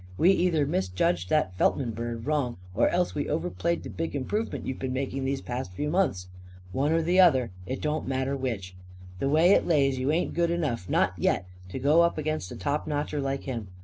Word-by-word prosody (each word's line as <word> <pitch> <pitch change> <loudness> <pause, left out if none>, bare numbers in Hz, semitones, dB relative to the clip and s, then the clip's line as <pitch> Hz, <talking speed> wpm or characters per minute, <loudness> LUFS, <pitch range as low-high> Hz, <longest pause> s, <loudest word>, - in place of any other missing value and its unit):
We 180 - +5
either 175 -6 +2
misjudged 95 - 0
that 150 -12 +1
Feltman 125 -4 +2
bird 115 +1 -5
wrong 145 -5 0 0.2
or - - +3
else 180 0 0
we 145 - -2
overplayed 170 +1 -1
the - - -7
big 165 -2 -4
improvement 205 - -2
you've 130 - -4
been 130 -1 -3
making 135 0 -2
these 135 0 -1
past 120 -6 -5
few 150 +9 -2
months. 170 - +1 0.5
One 140 +9 +1
or 165 0 +2
the 180 +3 +2
other. 130 - +5 0.2
It 130 - -4
don't 150 +1 -1
matter 135 +1 -1
which. 110 -9 -4 0.4
The 135 - 0
way 160 +5 +5
it - - +4
lays, 135 -5 +2
you 130 +3 +1
ain't 170 +3 0
good 170 -1 +1
enough 150 - -2
not - - +2
yet - - +1 0.2
to 95 - -5
go 145 +6 +4
up 170 -1 +2
against 155 -10 -2
a - - -6
top 145 +1 -2
notcher 145 0 -2
like 135 0 -2
him. 115 -6 -4
140 Hz, 210 wpm, -27 LUFS, 130-160 Hz, 0.5 s, We